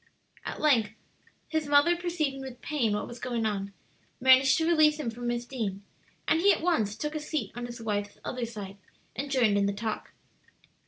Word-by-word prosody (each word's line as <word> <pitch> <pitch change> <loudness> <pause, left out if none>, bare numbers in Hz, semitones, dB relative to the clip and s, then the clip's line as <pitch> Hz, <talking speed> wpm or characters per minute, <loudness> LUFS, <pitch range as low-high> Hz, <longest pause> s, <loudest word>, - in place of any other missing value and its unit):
At - - -5
length, 235 -9 +3 0.5
his 315 -2 -1
mother 290 +4 +5
perceiving 330 -6 -2
with 260 -2 -8
pain 245 -8 0
what 210 - -2
was 240 - -9
going 235 -3 -2
on, 200 -2 -2 0.5
managed 260 +1 +6
to 320 - +1
release 310 -2 +4
him 240 -6 -2
from 240 +1 -6
Miss 240 0 -1
Deane, 215 -6 -4 0.4
and 320 - +3
he 400 +2 +6
at - - 0
once 220 - +1
took 300 +4 -4
a 310 - -2
seat 305 0 -3
on 240 0 -4
his 240 0 -8
wife's 205 -2 -3
other 250 -2 -3
side, 205 -3 -8 0.4
and 280 +1 -4
joined 235 -7 +3
in 200 - +2
the 200 - 0
talk. 215 +1 -4
245 Hz, 195 wpm, -28 LUFS, 220-300 Hz, 0.5 s, managed